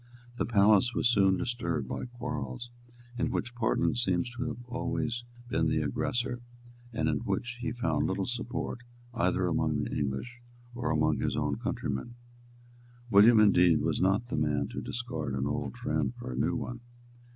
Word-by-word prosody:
The -, -, 0 dB
palace 110 Hz, +1 st, +4 dB
was -, -, +3 dB
soon 95 Hz, -4 st, +4 dB
disturbed 120 Hz, +2 st, -2 dB
by -, -, -4 dB
quarrels 120 Hz, 0 st, -5 dB, 0.5 s
in -, -, +1 dB
which 120 Hz, -, -2 dB
Portland 120 Hz, 0 st, +1 dB
seems 95 Hz, -1 st, 0 dB
to 125 Hz, +1 st, -2 dB
have 120 Hz, -, -3 dB
been 120 Hz, +2 st, -12 dB
always 120 Hz, -1 st, -2 dB, 0.3 s
the 80 Hz, -3 st, +2 dB
aggressor, 120 Hz, -, -1 dB, 0.5 s
and 80 Hz, -9 st, 0 dB
in 75 Hz, -2 st, +2 dB
which 120 Hz, -, -3 dB
he 120 Hz, -, -1 dB
found 120 Hz, +2 st, 0 dB
little 95 Hz, 0 st, -1 dB
support 120 Hz, 0 st, -3 dB, 0.3 s
either 90 Hz, -3 st, +1 dB
among 80 Hz, -4 st, +1 dB
the -, -, -4 dB
English 75 Hz, -, -3 dB, 0.3 s
or 125 Hz, +1 st, -2 dB
among 80 Hz, -1 st, +2 dB
his -, -, 0 dB
own -, -, 0 dB
countrymen. 70 Hz, -, -3 dB, 1.0 s
William, 110 Hz, +3 st, +8 dB
indeed, 90 Hz, -7 st, +5 dB
was -, -, 0 dB
not 100 Hz, +6 st, +2 dB
the -, -, -2 dB
man 75 Hz, -2 st, +1 dB
to -, -, -5 dB
discard 80 Hz, -, -3 dB
an 65 Hz, 0 st, -1 dB
old 70 Hz, -, -3 dB
friend 75 Hz, -4 st, -1 dB
for -, -, -6 dB
a -, -, -4 dB
new 65 Hz, -, +1 dB
one. 120 Hz, -1 st, -4 dB
105 Hz, 165 wpm, -30 LUFS, 80-120 Hz, 1.0 s, William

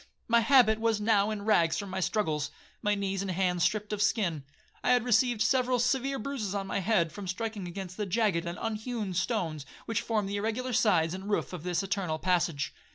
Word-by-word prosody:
My 235 Hz, 0 st, +5 dB
habit 230 Hz, -2 st, +5 dB
was 225 Hz, -1 st, +1 dB
now 210 Hz, -1 st, +3 dB
in 210 Hz, -2 st, -4 dB
rags 175 Hz, -7 st, +3 dB
from 200 Hz, -2 st, -5 dB
my 190 Hz, -, -2 dB
struggles, 155 Hz, -7 st, 0 dB, 0.3 s
my 210 Hz, 0 st, +1 dB
knees 195 Hz, -1 st, -2 dB
and 195 Hz, -, -3 dB
hands 180 Hz, -1 st, 0 dB
stript 210 Hz, +3 st, 0 dB
of 205 Hz, -, -2 dB
skin. 180 Hz, -, +1 dB, 0.4 s
I -, -, +4 dB
had 245 Hz, -2 st, +3 dB
received 240 Hz, -1 st, +3 dB
several 255 Hz, 0 st, +2 dB
severe 265 Hz, +2 st, +1 dB
bruises 220 Hz, -6 st, -3 dB
on 195 Hz, -1 st, -2 dB
my 195 Hz, -, -2 dB
head, 190 Hz, -4 st, +1 dB
from 200 Hz, +2 st, -7 dB
striking 205 Hz, 0 st, -4 dB
against 185 Hz, +1 st, -7 dB
the 210 Hz, -2 st, -2 dB
jagged 190 Hz, -4 st, +1 dB
and 170 Hz, -, -4 dB
unhewn 220 Hz, -2 st, -3 dB
stones 175 Hz, -, -1 dB, 0.2 s
which 225 Hz, 0 st, -1 dB
formed 215 Hz, -3 st, -1 dB
the 200 Hz, +1 st, -2 dB
irregular 225 Hz, +5 st, -2 dB
sides 180 Hz, -8 st, +3 dB
and 190 Hz, +2 st, -6 dB
roof 205 Hz, -, -1 dB
of 180 Hz, -, -5 dB
this 180 Hz, +2 st, -1 dB
eternal 190 Hz, -5 st, -1 dB
passage. 170 Hz, -4 st, 0 dB
205 Hz, 205 wpm, -29 LUFS, 180-225 Hz, 0.4 s, My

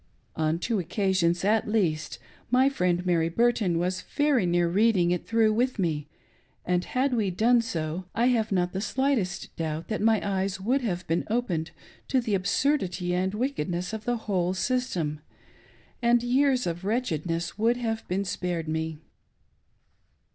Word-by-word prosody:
On 155 Hz, +1 st, +1 dB
two 215 Hz, +4 st, -1 dB
Occasions, 185 Hz, -1 st, +1 dB
at'lbast, 205 Hz, -6 st, +1 dB, 0.3 s
ifty 265 Hz, +2 st, +3 dB
Mend' 180 Hz, 0 st, +1 dB
Mary 165 Hz, -2 st, +2 dB
Burton 215 Hz, -3 st, +2 dB
was 180 Hz, +2 st, -1 dB
very 285 Hz, -8 st, +1 dB
near 175 Hz, 0 st, +2 dB
reading 190 Hz, -1 st, +3 dB
it 180 Hz, -, -2 dB
through 225 Hz, -1 st, +3 dB
with 250 Hz, +3 st, 0 dB
me, 155 Hz, -6 st, -1 dB, 0.6 s
and 180 Hz, 0 st, +1 dB
had 260 Hz, +1 st, 0 dB
we 215 Hz, -5 st, +1 dB
done 230 Hz, +6 st, +3 dB
so, 170 Hz, -4 st, -3 dB
I 235 Hz, -, +2 dB
have 225 Hz, -4 st, +1 dB
not 180 Hz, -2 st, +1 dB
the 190 Hz, -, -2 dB
slightest 255 Hz, -4 st, -1 dB
doubt 160 Hz, 0 st, -3 dB
that 215 Hz, -, -2 dB
my 220 Hz, 0 st, +4 dB
eyes 190 Hz, 0 st, -1 dB
would 250 Hz, +8 st, +1 dB
have 185 Hz, -6 st, -2 dB
been 165 Hz, +1 st, 0 dB
opened 185 Hz, -9 st, -1 dB, 0.4 s
to 265 Hz, -, +2 dB
the 230 Hz, -4 st, -2 dB
absurdity 190 Hz, -2 st, 0 dB
and 190 Hz, +2 st, 0 dB
wicked 250 Hz, -, -2 dB
ness 180 Hz, +4 st, -3 dB
of 220 Hz, 0 st, -5 dB
the 245 Hz, 0 st, 0 dB
whole 185 Hz, -4 st, -1 dB
system, 185 Hz, -, -1 dB, 0.8 s
and 235 Hz, 0 st, +3 dB
years 255 Hz, +1 st, +2 dB
of 170 Hz, +1 st, -3 dB
wretchedness' 170 Hz, -, -2 dB
would 230 Hz, +2 st, +3 dB
have 225 Hz, -2 st, -3 dB
been 195 Hz, +2 st, -1 dB
spared 175 Hz, -3 st, -3 dB
me. 160 Hz, 0 st, -2 dB
190 Hz, 155 wpm, -27 LUFS, 175-235 Hz, 0.8 s, my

